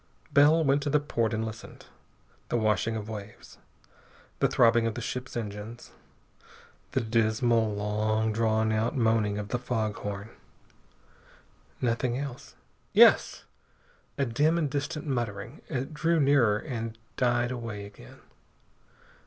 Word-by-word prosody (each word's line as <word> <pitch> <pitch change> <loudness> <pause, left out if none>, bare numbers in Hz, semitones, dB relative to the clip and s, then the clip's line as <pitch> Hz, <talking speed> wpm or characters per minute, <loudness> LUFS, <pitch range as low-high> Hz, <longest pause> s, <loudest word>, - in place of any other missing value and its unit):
Bell 150 +3 +6
went 140 0 +2
to 145 - -2
the 150 +1 +3
port 115 -6 -1
and 110 0 -1
listened. 110 0 -9 0.6
The - - +1
washing 110 0 +1
of 105 -1 -5
waves. 105 -1 -9 0.8
The - - +4
throbbing 115 -1 +4
of 115 - -3
the - - -4
ship's 125 +2 -5
engines. 105 +1 -7 1.0
The - - +1
dismal, 115 0 +1
long 110 +1 0
drawn 110 0 +1
out 110 +5 0
moaning 110 -3 +2
of 105 0 -5
the 125 - -1
fog 110 -4 -1
horn. 105 +2 -6 1.5
Nothing 120 0 0
else.... 135 -3 -7 0.4
Yes! - - +5 0.7
A 140 - +1
dim 150 +8 +2
and 150 -5 -1
distant 150 +2 -3
muttering. 120 -1 -4
It 135 +1 -4
drew 165 +2 +1
nearer 135 -7 +4
and 115 -3 -5 0.2
died 120 -1 +1
away 115 -5 -5
again. 100 -12 -14
115 Hz, 130 wpm, -28 LUFS, 110-130 Hz, 1.5 s, Bell